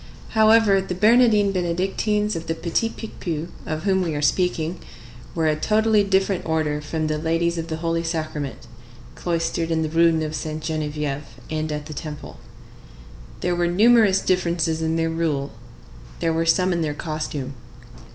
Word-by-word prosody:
However, 220 -3 +5
the 185 -1 -4
Bernardines 215 0 +4
Benedictines 195 +4 0
of 165 0 -5
the 165 - -1
Petit 175 +7 -1
Picpus, 170 -8 -5 0.2
of 155 0 -3
whom 190 -2 +2
we 165 -4 -1
are 145 - -2
speaking, 170 +1 0 0.6
were 165 -1 0
a 155 -1 +3
totally 215 +5 +3
different 195 -1 +1
order 155 -2 -1
from 155 +1 -3
the 155 0 -1
Ladies 165 +1 0
of 165 - -4
the 160 - -3
Holy 165 0 -1
Sacrament, 155 -6 -4 0.5
cloistered 165 -1 -2
in 160 -1 +1
the 155 - -2
Rue 165 +1 +4
Neuve 155 -1 -1
Sainte 155 0 -4
Geneviève 150 -2 -3 0.3
and 155 0 -2
at 150 0 -4
the 155 - -7
Temple. 150 -1 -8 1.0
There 180 0 0
were 175 0 +1
numerous 205 +1 +5
differences 170 -3 0
in 160 0 0
their 165 0 0
rule; 155 -4 -1 0.7
there 165 -1 +1
were 165 +1 0
some 180 +2 +3
in 170 - -1
their 150 -2 -1
costume. 155 -4 -4
165 Hz, 160 wpm, -23 LUFS, 155-185 Hz, 1.0 s, However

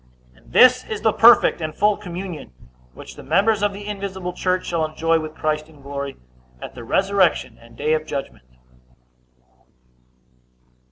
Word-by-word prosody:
And - - -22
this 255 0 +6
is 215 -1 -5
the 220 -2 +3
perfect 230 -6 +5
and 155 -1 -4
full 210 +1 +2
communion 175 - -8 0.4
which - - -11
the - - -11
members 210 +1 +1
of 205 0 +1
the 200 +1 -9
invisible 195 -3 -5
church 185 0 -1
shall 170 -2 -1
enjoy 165 +1 0
with 155 0 -7
Christ 155 0 -2
in 145 -3 -18
glory, 140 0 -6 0.4
at - - -9
the 120 - -10
resurrection 185 - +1
and 115 0 -18
day 150 +2 0
of 155 0 -2
judgment. 135 - -6
170 Hz, 155 wpm, -21 LUFS, 155-200 Hz, 0.4 s, this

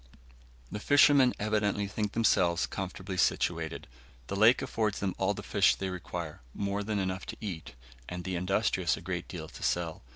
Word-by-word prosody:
The 105 - -4
fishermen 140 +1 +5
evidently 105 -1 0
think 105 +1 -3
themselves 90 -6 +3
comfortably 95 0 -5
situated. 80 -2 0 0.4
The 100 - -2
lake 110 +5 +5
affords 105 -2 -1
them 95 -2 -1
all 95 +2 +1
the 100 - -7
fish 100 -2 +3
they 95 - -3
require, 85 -4 -6
more 100 0 -1
than 105 0 -2
enough 95 -1 -2
to - - -6
eat, 85 - -6 0.3
and 90 0 -5
the 95 0 -3
industrious 90 0 +1
a - - -9
great - - -4
deal - - -7
to - - -12
sell. 85 -2 -1
95 Hz, 170 wpm, -30 LUFS, 90-105 Hz, 0.4 s, fishermen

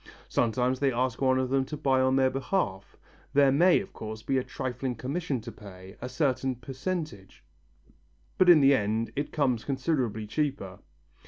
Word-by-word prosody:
Sometimes 125 +2 0
they 140 -1 +2
ask 125 0 -1
one 130 -1 +3
of 130 -1 -1
them 135 0 +2
to 150 - -6
buy 135 -3 +2
on 130 0 +2
their 130 -1 +3
behalf. 130 - -2 0.4
There 140 -1 +5
may, 170 +6 +5
of 195 - -11
course, 110 0 -7
be 135 -1 +1
a - - -3
trifling 130 0 -4
commission 140 +2 -3
to 115 +1 -8
pay, 95 -2 -12
a 125 - -5
certain 130 -3 0
percentage, 135 - -6 1.0
but 185 - +5
in 165 -4 +8
the 140 0 +6
end 110 -1 0
it 145 +1 -3
comes 130 -7 0
considerably 130 -6 -1
cheaper. 120 -6 -3
130 Hz, 170 wpm, -28 LUFS, 115-140 Hz, 1.0 s, in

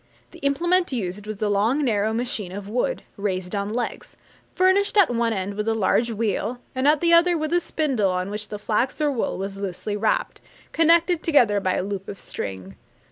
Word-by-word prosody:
The - - -13
implement 345 +6 +1
used 210 -4 -4
was 215 -2 -5
a - - +2
long 220 +8 +1
narrow 215 -2 +1
machine 225 -5 -3
of 200 +1 -7
wood, 250 - -1
raised 185 -2 -3
on 200 0 -2
legs, 240 +2 -4 0.4
furnished 380 +3 +3
at 380 -10 +6
one 230 -1 +1
end 195 -1 -2
with 210 +2 -3
a 225 - +2
large 225 +3 +2
wheel, 225 +2 -2
and 260 +1 0
at 300 0 +4
the 340 0 +3
other 345 +1 +5
with 310 +1 -2
a 350 - +4
spindle 275 - 0
on 185 +1 -2
which 210 0 -5
the 210 - -6
flax 225 +7 -1
or 300 -1 +2
wool 250 - -2
was 195 +1 -5
loosely 200 +1 -4
wrapped, 215 +1 -1 0.3
connected 335 +1 +3
together 240 -10 +3
by 185 -1 0
a - - -1
loop 195 0 -5
of 200 - -7
string. 95 0 -6
220 Hz, 200 wpm, -23 LUFS, 200-295 Hz, 0.4 s, at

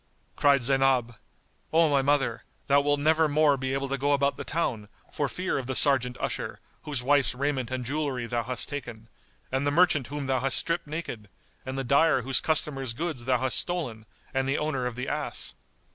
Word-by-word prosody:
Cried 140 -3 +3
Zaynab, 135 -2 +2 0.6
"O 165 0 +4
my 140 -2 +2
mother, 135 -4 +1 0.2
thou 140 0 +4
wilt 145 0 +1
never 160 +2 +3
more 150 -1 +3
be 130 0 -2
able 135 0 -2
to 135 0 -3
go 145 +2 +2
about 140 0 +1
the - - -6
town, 115 -10 -2 0.2
for 145 -2 -1
fear 185 -5 -2
of 130 - -6
the 130 - -2
Serjeant 125 -3 +3
usher, - - -4 0.3
whose 140 -5 -3
wife's 140 -1 +3
raiment 135 -2 -1
and 130 -1 -4
jewellery 140 -2 -2
thou 120 0 -1
hast 125 +1 -2
taken, 120 -5 -7 0.4
and 135 +2 0
the - - +4
merchant 155 -3 +3
whom 145 0 -5
thou 130 -1 +1
hast 135 +1 +3
stripped 170 -1 0
naked, 145 -9 -6 0.4
and 130 +1 -4
the 135 - -1
dyer 140 +1 +3
whose 135 +1 +1
customers' 135 -6 -1
goods 155 -5 -4
thou 130 -1 +2
hast 130 +1 +3
stolen 125 -12 -3 0.3
and 135 0 0
the 135 - +1
owner 140 -5 -1
of 120 - -5
the 125 +1 -4
ass." - - -2
135 Hz, 200 wpm, -27 LUFS, 125-145 Hz, 0.6 s, O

